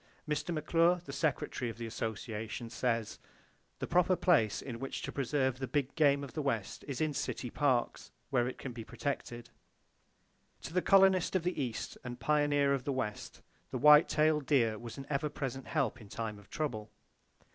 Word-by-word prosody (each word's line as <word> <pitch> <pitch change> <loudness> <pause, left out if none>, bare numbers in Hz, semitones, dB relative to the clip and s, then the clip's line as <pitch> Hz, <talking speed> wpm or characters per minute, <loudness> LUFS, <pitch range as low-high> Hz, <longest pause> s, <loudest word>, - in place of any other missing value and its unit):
Mr. 150 +2 -1
McClure, 165 +2 +3
the - - -7
Secretary 135 -5 -1
of 115 - -8
the 115 - -5
Association 110 +1 -4
says: 115 -4 -1 0.6
"The - - -3
proper 180 +1 +3
place 145 - +3
in 120 -3 -6
which 135 - -5
to - - -4
preserve 130 -1 0
the 130 - -3
big 140 -1 -1
game 140 -3 +3
of 140 - -8
the 155 - -2
West 115 -8 -2
is 140 +1 -3
in 155 -1 +1
city 125 -3 -3
parks, 130 -5 0 0.2
where 120 0 +2
it 130 - -5
can 130 - -6
be 115 -1 -7
protected." 120 -2 -4 1.1
[Page - - -30
3] - - -4
To - - -12
the 180 - +2
colonist 190 -2 +5
of 185 - +2
the 175 -4 -1
East 120 -4 -4
and 125 0 -6
pioneer 145 -2 +2
of 135 -2 -1
the 140 - -1
West, 130 -6 -4 0.3
the - - -3
white 150 +1 +7
tailed 155 -2 +2
deer 115 -7 +3
was 115 -1 -8
an 135 - -7
ever 150 +1 -1
present 135 -2 -5
help 140 -10 -1
in 105 - -13
time 110 -1 -4
of 100 - -18
trouble. 110 -9 -3
135 Hz, 190 wpm, -32 LUFS, 120-150 Hz, 1.1 s, white